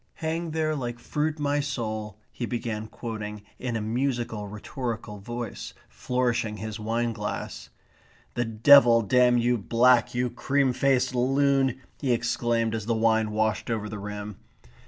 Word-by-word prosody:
'Hang 165 +1 -3
there 155 -1 0
like 120 -4 -4
fruit 150 +5 -2
my 145 -1 0
soul,'" 110 -7 -3
he 120 - -4
began 110 -3 -3
quoting, 110 -2 -6 0.2
in 125 -2 -3
a 115 - -1
musical 115 -2 -2
rhetorical 110 0 -5
voice, 120 +2 -6
flourishing 120 -4 -1
his 110 +1 -6
wine 115 +2 -1
glass. 105 -1 -5 0.6
"The 120 - 0
devil 115 +1 +6
damn 125 +2 +4
you 120 0 +2
black, 120 +4 +3
you 125 0 0
cream 135 +1 +1
faced 130 -1 +2
loon!" 135 0 +2 0.2
he 130 -4 +1
exclaimed 115 -1 0
as 110 -1 -4
the 115 - +1
wine 110 -1 +2
washed 110 0 0
over 110 -2 -1
the 105 -1 -6
rim. 105 0 -6
120 Hz, 145 wpm, -26 LUFS, 110-130 Hz, 0.6 s, devil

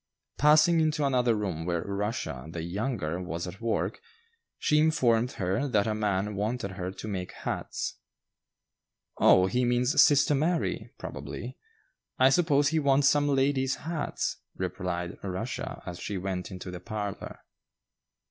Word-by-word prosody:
Passing 155 +3 +6
into 155 -2 +1
another 125 -4 +2
room 95 -6 -3
where 85 -1 -1
"Rushia" 100 - -3
the 85 -1 -5
younger 90 - -2
was 85 -1 -4
at 95 +4 -9
work, 115 - -1 0.6
she 150 - +2
informed 125 -7 +3
her 95 +9 -1
that 105 -6 +2
a 110 - 0
man 105 -1 0
wanted 105 +1 -2
her 90 -1 -4
to 95 +3 -8
make 95 -3 -4
hats. - - -4 1.2
"Oh, 90 - +6
he 125 +6 +1
means 125 +4 +3
sister 145 -1 +5
Mary; 160 +5 0
probably. - - -7 0.6
I 130 +1 +6
suppose 145 -2 +3
he 160 +1 +1
wants 140 -1 +4
some 145 0 +2
ladies' 135 -1 +2
hats," 165 -1 -2 0.2
replied 90 -1 -3
Rushia, 95 +5 -4
as 90 -1 -6
she 100 +2 -4
went 95 -1 -3
into 90 -1 -7
the 90 - -6
parlor. 105 0 -5
110 Hz, 140 wpm, -28 LUFS, 90-140 Hz, 1.2 s, Passing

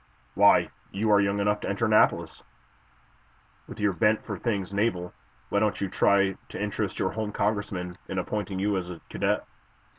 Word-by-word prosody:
Why, - - +5 0.2
you 105 +2 0
are 100 -1 +6
young 100 +1 0
enough 105 +1 +1
to - - -4
enter 100 +3 0
Annapolis. 110 -1 +2 1.3
With - - -10
your 105 -2 +2
bent 105 +5 +2
for 100 - -4
things 100 -4 -2
naval, 100 -4 -1 0.4
why 100 - +2
don't 105 -3 +1
you 100 - -2
try 100 -1 +3
to - - -7
interest 105 0 -2
your 95 - 0
home 110 -1 -3
Congressman 100 -4 -2
in 95 - -4
appointing 100 +1 -2
you 100 +1 +1
as 90 -1 -4
a 85 -2 -7
cadet?" - - 0
100 Hz, 175 wpm, -27 LUFS, 95-105 Hz, 1.3 s, are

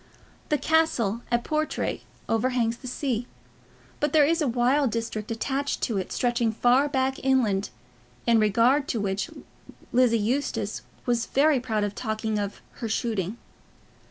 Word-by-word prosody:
The 300 - +3
castle 275 -8 +1
at 240 0 +1
Portray 310 0 -1 0.3
overhangs 235 0 +1
the 255 - -10
sea, 245 -2 -2 0.7
but 295 -1 0
there 305 -2 +6
is 330 +3 +1
a 295 - +2
wild 250 +3 +2
district 225 -2 -3
attached 270 +5 -2
to 220 -6 0
it 185 - -5
stretching 240 -2 +1
far 250 +6 +3
back 265 -1 0
inland, 230 -7 +2 0.6
in 230 -1 +4
regard 235 +7 +3
to 230 - -1
which 195 -1 -1 0.6
Lizzie 240 -2 +4
Eustace 245 +7 -1 0.2
was 240 -2 0
very 290 0 +3
proud 220 -4 -1
of 205 -1 -2
talking 220 -1 -2
of 200 0 -4 0.2
"her 230 - -3
shooting." 215 -2 -1
240 Hz, 145 wpm, -26 LUFS, 220-270 Hz, 0.7 s, there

